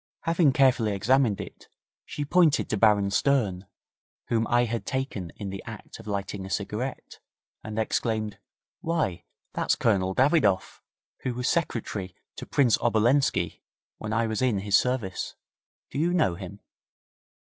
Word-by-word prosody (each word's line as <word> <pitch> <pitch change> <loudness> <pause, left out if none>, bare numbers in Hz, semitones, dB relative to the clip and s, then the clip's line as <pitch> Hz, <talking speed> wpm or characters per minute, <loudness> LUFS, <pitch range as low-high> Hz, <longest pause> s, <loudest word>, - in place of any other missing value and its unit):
Having 165 -4 +3
carefully 125 -5 +3
examined 115 +1 +2
it, - - -9 0.4
she 145 - -4
pointed 165 -1 +3
to - - +2
Baron 100 -2 +4
Stern, 105 -5 +1 0.6
whom 115 -1 +1
I 120 0 +3
had 115 0 -3
taken 130 -10 -3
in 100 -2 -6
the 95 - -6
act - - -9
of - - -12
lighting 100 -1 -3
a 95 - -7
cigarette, 110 +7 -4 0.4
and 110 0 -6
exclaimed 110 -1 -1 0.4
'Why! 160 - -1 0.3
that's - - +1
Colonel 95 -4 +1
Davidoff, 130 - +2 0.4
who 125 -2 -3
was 125 +1 -2
secretary 110 - -2 0.2
to - - -7
Prince 125 -6 +3
Obolenski 120 +4 +2 0.4
when 110 - -5
I 115 +1 +1
was 110 0 -2
in 120 -7 +1
his 100 0 +2
service. 125 -7 0 0.6
Do - - -3
you 175 +3 +2
know 155 - +3
him?' 95 +3 -9
110 Hz, 145 wpm, -27 LUFS, 100-130 Hz, 0.6 s, Baron